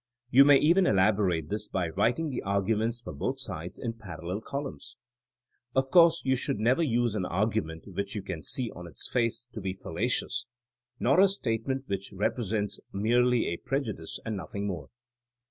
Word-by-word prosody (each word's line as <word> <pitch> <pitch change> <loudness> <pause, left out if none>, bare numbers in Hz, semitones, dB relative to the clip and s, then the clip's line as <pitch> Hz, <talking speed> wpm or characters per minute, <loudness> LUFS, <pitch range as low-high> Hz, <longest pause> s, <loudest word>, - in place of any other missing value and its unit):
You 135 +2 +8
may 145 -1 +8
even 175 +6 +4
elaborate 95 -5 +2
this 105 +1 -2
by 90 -3 -1
writing 120 - +1
the 125 - -3
arguments 110 +4 0
for - - -7
both 135 +1 -2
sides 90 -8 -5
in 115 -2 -3
parallel 90 -3 -6
columns. 140 +3 -6 0.8
Of 135 0 +1
course 170 -2 +6
you 130 0 +3
should 120 - 0
never 120 +8 +2
use 120 -6 +1
an 95 -4 -1
argument 95 -4 -1
which 100 +2 -4
you 105 - -3
can 85 -5 -5
see 125 +5 -1
on 85 0 -9
its 80 - -4
face 115 -1 0
to 110 - -6
be 95 -1 -2
fallacious, 105 +7 -1 0.5
nor 140 +7 +3
a 195 - +8
statement 130 - -1
which 100 -2 -4
repre 105 +5 0
sents 105 0 -2
merely 120 +4 +2
a 85 - -2
prejudice 110 - -3
and 110 -1 -2
nothing 100 +1 -5
more. 90 -8 -4
110 Hz, 175 wpm, -29 LUFS, 95-125 Hz, 0.8 s, You